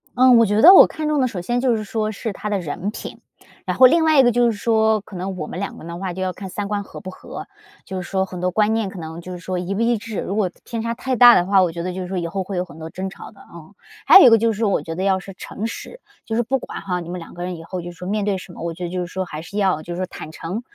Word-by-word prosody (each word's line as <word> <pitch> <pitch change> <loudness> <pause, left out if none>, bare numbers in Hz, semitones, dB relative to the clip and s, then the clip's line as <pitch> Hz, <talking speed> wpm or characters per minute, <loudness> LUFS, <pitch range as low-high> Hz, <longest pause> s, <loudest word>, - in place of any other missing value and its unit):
嗯， 255 -1 +6
我 230 - +6
觉 210 +1 +1
得 360 +4 +10
我 - - +10
看 310 -1 -4
中 300 -1 +1
的 255 - +3
首 200 -7 -5
先 240 +7 -1
就 250 -2 +2
是 215 - -3
说 215 +1 -2
是 220 0 -5
他 205 - -6
的 205 -1 0
人 175 +4 -4
品， - - -8 0.5
然 - - -2
后 260 - +8
另 325 +5 +3
外 310 -3 +5
一 - - +8
个 245 - +4
就 240 0 +3
是 - - -5
说， 220 0 +2
可 195 - -13
能 185 +1 -4
我 155 -3 -4
们 180 - -6
两 200 - -4
个 - - -12
的 170 0 -6
话 185 0 -4
就 185 - -6
要 185 0 -1
看 195 - -8
三 200 +2 -4
观 205 0 -2
合 - - -11
不 185 - -7
合， 185 - -9 0.4
就 190 -1 -5
是 180 - -7
说 190 -1 +1
很 185 -1 -7
多 180 +1 0
观 215 +3 +2
念 220 -3 -1
可 190 - -9
能， 160 +1 -7
就 185 - -9
是 180 - -7
说 185 +1 -4
一 180 +2 -3
不 200 - -2
一 235 0 +2
致， 220 -1 -6
如 195 - -3
果 200 -4 0
偏 230 -2 -5
差 230 0 -1
太 260 +2 -2
大 245 0 +9
的 175 - +3
话， 195 -1 +5
我 175 - 0
觉 170 +1 -6
得 180 +2 -3
就 185 - -5
是 - - -6
说 185 0 -3
以 170 - -3
后 190 +3 -3
会 190 0 -5
有 180 - 0
很 160 -4 -14
多 160 0 -8
争 190 +1 -4
吵 - - -11
的， 205 - -18
嗯。 170 +3 -13 0.3
还 - - +10
有 370 - +9
一 - - +9
个 225 - +6
就 225 +1 +1
是 220 +2 -1
我 195 -7 +1
觉 165 - -5
得 175 - -4
要 195 -1 +2
是 195 +1 -10
诚 210 - -6
实， 355 - -7 0.3
就 225 - -3
是 240 - +2
不 265 +3 -1
管， - - -7
哈， 180 -2 -2
你 170 -1 -8
们 180 - -4
两 165 - -11
个 175 - -9
人 180 0 -4
以 165 - -10
后， 180 +2 -5
就 175 +1 -7
是 175 - -17
说 180 - -7
面 210 +1 -1
对 200 -2 0
什 185 -1 -11
么， - - -11
我 170 0 -3
觉 180 - -7
得 175 - -3
就 185 - -3
是 175 - -3
说 185 +2 -4
还 155 -3 -7
是 200 +5 -8
要， 190 -6 +1
就 175 +2 -6
是 - - -7
说 185 - -1
坦 155 -3 -9
诚 175 +7 -5
195 Hz, 375 characters per minute, -21 LUFS, 180-225 Hz, 0.5 s, 得